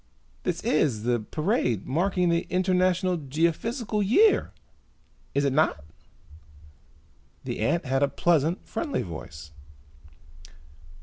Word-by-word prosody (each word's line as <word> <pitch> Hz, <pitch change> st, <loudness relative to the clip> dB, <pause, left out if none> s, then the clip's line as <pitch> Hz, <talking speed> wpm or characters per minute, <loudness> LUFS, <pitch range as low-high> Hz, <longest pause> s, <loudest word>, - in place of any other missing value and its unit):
"This -, -, -3 dB
is 130 Hz, -8 st, +1 dB
the 120 Hz, 0 st, +1 dB
parade 125 Hz, -, -1 dB
marking 180 Hz, +4 st, +1 dB
the 170 Hz, 0 st, 0 dB
International 185 Hz, -1 st, +1 dB
Geophysical 170 Hz, -, -1 dB
Year, 405 Hz, -, +4 dB, 0.8 s
is 140 Hz, 0 st, +2 dB
it 140 Hz, -, +1 dB
not?" 135 Hz, -, +1 dB, 1.6 s
The -, -, -5 dB
ant 170 Hz, +1 st, 0 dB
had 135 Hz, +1 st, 0 dB
a 140 Hz, -, +4 dB
pleasant, 165 Hz, +3 st, +1 dB
friendly 300 Hz, -4 st, -3 dB
voice. 80 Hz, -3 st, -9 dB
165 Hz, 105 wpm, -26 LUFS, 135-185 Hz, 1.6 s, Year